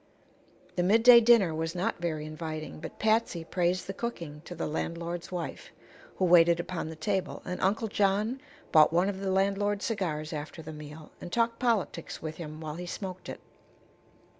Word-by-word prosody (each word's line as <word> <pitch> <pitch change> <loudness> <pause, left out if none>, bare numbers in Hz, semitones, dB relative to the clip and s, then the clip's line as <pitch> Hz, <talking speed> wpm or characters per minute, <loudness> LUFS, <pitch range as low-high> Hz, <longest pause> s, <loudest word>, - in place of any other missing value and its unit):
The - - +3
mid 210 +6 +4
day 240 -1 +10
dinner 220 -8 +5
was 160 +2 -3
not 180 0 -1
very 155 -3 -2
inviting, 155 0 -6
but - - -8
Patsy 220 -6 +1
praised 180 +2 0
the 195 - -5
cooking 170 -11 -5
to 175 - -7
the 165 - -3
landlord's 170 +3 -4
wife, 175 -2 -5 0.5
who 190 - +1
waited 170 -1 +6
upon 175 -2 -4
the 160 - -7
table, 190 +3 -2
and 180 0 -4
Uncle 215 +4 +1
John 210 +5 +1 0.3
bought 155 -1 +7
one 175 +4 +3
of 195 -1 -4
the 195 -1 -2
landlord's 200 +2 +1
cigars 165 -8 -2
after 155 +2 -6
the 155 0 -8
meal 150 +1 -10
and 175 - -7
talked 230 +1 +1
politics 225 -8 -1
with 155 -1 -6
him 155 -2 -7
while 155 0 -5
he 180 0 -6
smoked 185 0 -6
it. - - -7
175 Hz, 180 wpm, -29 LUFS, 160-200 Hz, 0.5 s, day